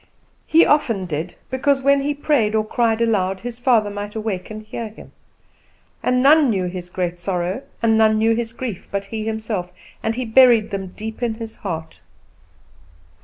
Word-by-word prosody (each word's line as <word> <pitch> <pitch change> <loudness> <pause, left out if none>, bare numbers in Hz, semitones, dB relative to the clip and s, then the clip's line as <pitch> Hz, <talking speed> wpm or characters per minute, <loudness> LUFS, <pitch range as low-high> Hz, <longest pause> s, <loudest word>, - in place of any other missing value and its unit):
He 325 +2 +6
often 230 -10 +2
did, 165 +1 -4 0.2
because, 270 +1 +1
when 280 0 +4
he 290 +1 -1
prayed 265 -8 +1
or 215 0 +1
cried 225 0 +1
aloud, 195 -5 +1
his 240 0 -6
father 230 -5 +3
might 205 +1 -6
awake 215 -4 -3
and 215 0 -7
hear 220 +1 -6
him; 215 - -14 0.9
and 250 0 +2
none 295 0 +6
knew 190 -5 0
his 180 0 -6
great 175 -1 -3
sorrow, 180 +4 -2 0.2
and 225 -1 +4
none 220 -1 +4
knew 225 +1 +3
his 230 -1 -3
grief, 230 -5 -6
but 200 0 -3
he 215 +2 -5
himself, 220 -5 -3 0.3
and 225 0 -1
he 255 0 -2
buried 235 -2 +5
them 195 -1 -3
deep 220 +2 -7
in 235 -2 0
his 225 -1 -8
heart. 160 - -6
220 Hz, 175 wpm, -21 LUFS, 195-240 Hz, 0.9 s, He